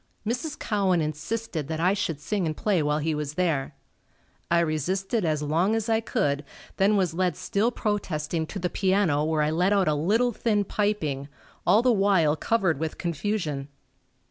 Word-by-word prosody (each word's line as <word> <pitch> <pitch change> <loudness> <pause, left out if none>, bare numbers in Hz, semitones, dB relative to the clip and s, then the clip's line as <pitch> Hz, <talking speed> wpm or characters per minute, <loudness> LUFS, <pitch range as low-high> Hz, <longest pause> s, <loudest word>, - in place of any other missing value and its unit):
Mrs. 250 +7 -2
Cowan 195 -4 +1
insisted 155 +2 -3
that 160 0 -3
I 180 +3 +3
should 180 -7 -2
sing 180 +3 -1
and 155 - -3
play 200 -6 +1
while 150 0 +1
he 155 +1 -1
was 150 -1 -4
there. 155 -6 0 0.7
I 170 - +4
resisted 185 - -1
as 155 -3 0
long 170 +8 +1
as 225 0 -2
I 220 0 +3
could, 150 - -1 0.3
then 200 +2 +4
was 180 -4 +1
led 180 -2 0
still 220 +2 0
protesting 170 -8 -2
to 200 - -6
the 180 -2 -1
piano 190 -7 +2
where 155 -1 +1
I 150 - +1
let 180 +5 +2
out 195 -2 +2
a 155 - +3
little 210 +12 +2
thin 210 -2 +1
piping, 175 -10 -1 0.4
all 220 - +5
the 250 - +4
while 195 -7 +3
covered 185 -5 +1
with 160 -1 -3
confusion. 170 -5 -2
180 Hz, 175 wpm, -26 LUFS, 155-205 Hz, 0.7 s, all